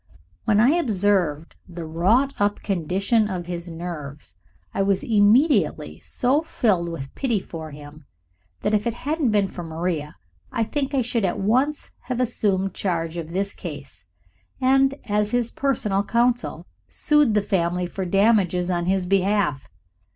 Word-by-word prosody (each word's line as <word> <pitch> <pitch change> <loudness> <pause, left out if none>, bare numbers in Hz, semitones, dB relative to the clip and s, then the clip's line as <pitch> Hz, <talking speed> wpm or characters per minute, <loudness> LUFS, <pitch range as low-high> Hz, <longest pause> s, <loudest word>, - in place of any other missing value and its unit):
When 210 -2 +3
I 235 +4 +5
observed 195 - 0
the 170 -1 -7
wrought 205 - +2
up 205 0 0
condition 195 +4 +1
of 180 -3 -4
his 175 0 -5
nerves, 155 - -7 0.4
I - - 0
was 195 -1 +1
immediately 205 - +3
so 265 +5 0
filled 200 - 0
with 135 -5 -7
pity 240 -6 0
for 160 -4 -8
him 145 0 -12 0.6
that 210 - 0
if 210 +2 +1
it 235 - -2
hadn't 295 +1 -1
been 205 -2 +2
for 180 - -8
Maria 160 -2 -3 0.4
I 230 - 0
think 275 +4 -2
I 260 - +2
should 230 -1 -1
at 185 - 0
once 255 +9 0
have 250 -1 -3
assumed 195 -6 0
charge 165 -3 -2
of 165 -2 -5
his 195 +3 -2
case, 145 - -9 0.6
and, 270 +1 +3
as 210 0 0
his 240 0 0
personal 215 -8 0
counsel, 240 +3 0 0.2
sued 295 -8 +2
the 210 - +3
family 180 -2 0
for 190 +2 -4
damages 185 -2 +2
on 175 0 -1
his 190 -1 +1
behalf. 195 -6 +1
195 Hz, 150 wpm, -23 LUFS, 170-235 Hz, 0.6 s, I